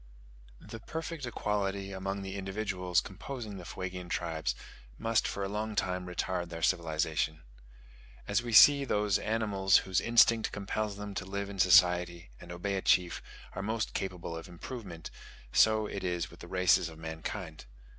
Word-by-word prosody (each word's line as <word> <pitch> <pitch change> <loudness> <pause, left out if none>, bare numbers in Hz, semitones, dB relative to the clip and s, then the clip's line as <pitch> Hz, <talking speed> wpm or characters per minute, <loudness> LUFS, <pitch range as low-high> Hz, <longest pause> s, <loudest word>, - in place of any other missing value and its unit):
The 115 - -9
perfect 160 +2 -5
equality 100 -3 -2
among 95 +1 -4
the 95 0 -5
individuals 95 -3 -1
composing 105 +1 -7
the 90 - -9
Fuegian 90 -1 -6
tribes 80 -7 -2 0.4
must 115 0 +1
for 100 - -3
a - - -1
long 105 +2 -3
time 90 -2 -1
retard 90 0 -2
their 85 -1 -6
civilization. 80 -2 0 0.8
As 100 +3 +2
we 120 -1 -5
see 140 +5 +8
those 105 -6 +1
animals, 105 -4 +2
whose 95 -1 +1
instinct 115 -1 +4
compels 105 0 -3
them 105 0 -6
to 100 -1 -4
live 100 +1 -4
in 100 - -9
society 90 -4 +4
and 85 - -11
obey 95 +3 -2
a - - -2
chief, 90 -2 +2 0.3
are - - -4
most 110 +2 -2
capable 90 -3 -4
of 80 - -7
improvement, 90 -1 -8 0.4
so 110 -1 +5
is 90 -4 -2
it - - -15
with - - -14
the - - -10
races 90 -2 +3
of 80 - -12
mankind. 80 +1 -6
95 Hz, 160 wpm, -31 LUFS, 90-105 Hz, 0.8 s, see